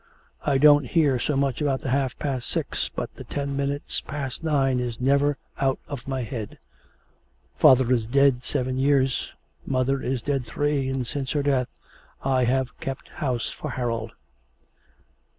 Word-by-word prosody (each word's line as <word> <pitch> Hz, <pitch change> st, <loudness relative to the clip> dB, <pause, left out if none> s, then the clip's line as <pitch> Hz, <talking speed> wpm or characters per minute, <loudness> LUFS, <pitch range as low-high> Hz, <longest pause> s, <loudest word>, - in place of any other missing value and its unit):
I 140 Hz, -2 st, +2 dB
don't 145 Hz, -1 st, +6 dB
hear 145 Hz, -4 st, +3 dB
so 145 Hz, +3 st, 0 dB
much 135 Hz, -1 st, 0 dB
about 140 Hz, -3 st, +1 dB
the 130 Hz, -, -3 dB
half 135 Hz, -1 st, 0 dB
past 130 Hz, -5 st, -3 dB
six, -, -, -1 dB
but -, -, -5 dB
the -, -, -10 dB
ten 140 Hz, -1 st, -3 dB
minutes 140 Hz, +1 st, -1 dB
past 140 Hz, 0 st, -5 dB
nine 135 Hz, -5 st, +2 dB
is 120 Hz, -2 st, -3 dB
never 140 Hz, +2 st, +2 dB, 0.2 s
out 135 Hz, -1 st, +2 dB
of 135 Hz, -4 st, -7 dB
my 135 Hz, -2 st, -2 dB
head. 110 Hz, -3 st, -6 dB, 1.0 s
Father 130 Hz, -1 st, +6 dB
is 115 Hz, -3 st, 0 dB
dead 135 Hz, 0 st, +4 dB
seven 130 Hz, -2 st, -1 dB
years, 135 Hz, -1 st, +2 dB, 0.3 s
mother 135 Hz, +1 st, 0 dB
is 125 Hz, -2 st, -2 dB
dead 140 Hz, -3 st, 0 dB
three, 135 Hz, +3 st, -1 dB
and 135 Hz, -1 st, -2 dB
since 135 Hz, +2 st, -3 dB
her 145 Hz, -2 st, +1 dB
death 135 Hz, -3 st, +2 dB, 0.6 s
I 130 Hz, -2 st, +2 dB
have 130 Hz, +1 st, 0 dB
kept 135 Hz, -1 st, -5 dB
house 125 Hz, -6 st, -1 dB
for -, -, -6 dB
Harold.' 115 Hz, -3 st, -3 dB
135 Hz, 160 wpm, -25 LUFS, 125-140 Hz, 1.0 s, don't